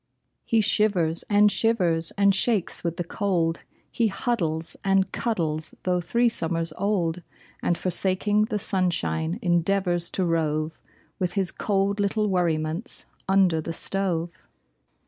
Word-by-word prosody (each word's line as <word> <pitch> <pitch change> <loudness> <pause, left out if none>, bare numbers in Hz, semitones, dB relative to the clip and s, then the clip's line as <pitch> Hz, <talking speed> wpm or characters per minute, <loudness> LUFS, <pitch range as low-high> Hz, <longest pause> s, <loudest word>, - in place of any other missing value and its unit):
He 225 -1 +2
shivers 185 -6 +2
and 205 0 +5
shivers 180 -6 +2
and 200 0 +4
shakes 200 -1 +1
with 170 -1 -3
the 175 - -2
cold; 170 -3 -1 0.3
He 230 - +1
huddles 170 -8 -2
and 195 -1 +2
cuddles, 160 -9 -2
though 180 -1 0
three 235 +7 +1
summers 165 -6 0
old. 180 -4 -1 0.4
And 175 - 0
forsaking 190 +3 +2
the 215 -1 -3
sunshine, 180 -4 0
endeavors 175 0 +1
to 185 - +1
rove 155 -1 -1 0.4
With 180 -2 -1
his 190 -3 -1
cold 200 0 -1
little 210 +1 0
worriments 170 +2 -2 0.2
under 190 -4 +3
the 165 - -5
stove! 175 -2 -2
185 Hz, 125 wpm, -25 LUFS, 165-200 Hz, 0.4 s, and